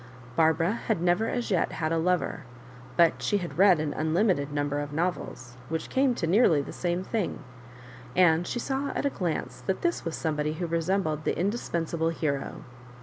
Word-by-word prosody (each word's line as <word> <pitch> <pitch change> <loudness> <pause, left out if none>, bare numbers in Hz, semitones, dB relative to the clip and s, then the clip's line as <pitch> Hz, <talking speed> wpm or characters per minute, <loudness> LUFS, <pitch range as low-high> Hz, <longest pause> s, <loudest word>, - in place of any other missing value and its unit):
Barbara 165 +3 +3 0.2
had 220 -6 +1
never 175 +6 +2
as 245 -3 -2
yet 185 - +1
had 155 0 -2
a 165 - +2
lover, 180 +2 0 0.5
but 170 -2 +4
she 205 - +1
had 175 -2 -5
read 190 -4 +6
an 150 -1 -1
unlimited 160 -2 +1
number 145 0 -1
of 145 0 -4
novels, 145 -6 -3
which 160 0 -3
came 260 -2 +3
to 170 - -1
nearly 170 -3 +4
the - - -8
same 175 +1 -1
thing, 205 -6 -2 0.7
and 175 -1 +4
she - - -3
saw 270 +3 -2
at - - -1
a 280 - +2
glance 175 -8 -3
that 190 - -1
this 345 0 0
was 165 -1 -3
somebody 150 -1 -1
who 175 +3 -3
resembled 165 -1 0
the - - -1
indispensable 170 -5 -1
hero. 145 -4 -3
170 Hz, 180 wpm, -27 LUFS, 155-190 Hz, 0.7 s, read